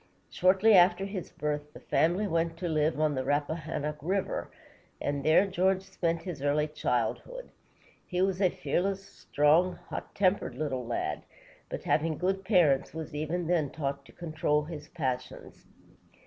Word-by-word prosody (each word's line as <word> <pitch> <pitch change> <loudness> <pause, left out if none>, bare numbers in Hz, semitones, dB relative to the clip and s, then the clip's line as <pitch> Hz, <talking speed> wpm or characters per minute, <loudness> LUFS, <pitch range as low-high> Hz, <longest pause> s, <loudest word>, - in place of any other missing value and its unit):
Shortly 190 +4 +4
after 180 0 +5
his 195 -3 -5
birth, 150 0 -3
the - - -10
family 175 +6 +1
went 165 -2 0
to 175 - -3
live 155 -1 +1
on 155 -1 +2
the 130 -1 -1
Rap 145 +2 +1
pa - - 0
han´nock 150 -2 -4
River, 190 +5 -1 0.5
and 145 -1 -2
there 155 +6 +5
George 190 0 +1
spent 170 -3 -2
his 170 -6 -6
early 145 +2 +2
childhood. - - -2 0.6
He 180 - -2
was 190 0 0
a 185 - +5
fearless, 195 +3 -1
strong, 165 +1 +2
hot - - -6
tempered 190 -9 +1
little 130 -4 -3
lad, 75 -10 -2 0.5
but, - - -5
having 155 0 +1
good 190 +1 -1
parents, 170 -9 +3
was 160 -1 -6
even 155 +4 -2
then 160 -4 +1
taught 140 -2 -3
to - - -16
control 155 -3 0
his 150 -2 -8
passions. 130 -7 -5
165 Hz, 160 wpm, -29 LUFS, 150-185 Hz, 0.6 s, after